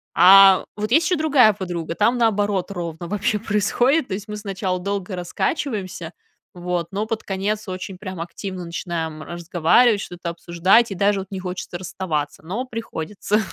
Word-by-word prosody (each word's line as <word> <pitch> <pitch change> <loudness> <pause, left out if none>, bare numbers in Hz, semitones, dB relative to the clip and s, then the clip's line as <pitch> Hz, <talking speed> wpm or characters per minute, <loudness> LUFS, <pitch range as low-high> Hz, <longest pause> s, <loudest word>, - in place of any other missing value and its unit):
А 190 +2 +8
вот 210 +1 -4
есть 315 +6 +4
еще 360 +1 +1
другая 285 -8 +5
подруга. 175 -4 -4
Там 230 +6 +2
наоборот 205 -4 +1
ровно 170 -2 -5
вообще 210 +3 0
происходит. 240 +8 +1
То 190 - -3
есть 205 +2 -8
мы 210 0 -5
сначала 195 -3 -3
долго 195 0 -3
раскачиваемся, 185 - -3 0.4
вот, 175 -1 -2
но 205 +2 -2
под 225 0 -3
конец 205 +2 -2
очень 185 0 -6
прям 185 -3 -7
активно 180 +2 -6
начинаем 165 -2 -4
разговаривать, 175 +7 +2
что-то 175 -1 -6
обсуждать, 175 +7 +2
и - - -3
даже 200 +2 +2
вот 190 - -6
не 190 - -4
хочется 180 -1 -5
расставаться, 170 -5 -4
но 205 +10 -4
приходится. 210 -3 -3
195 Hz, 160 wpm, -22 LUFS, 175-210 Hz, 0.4 s, А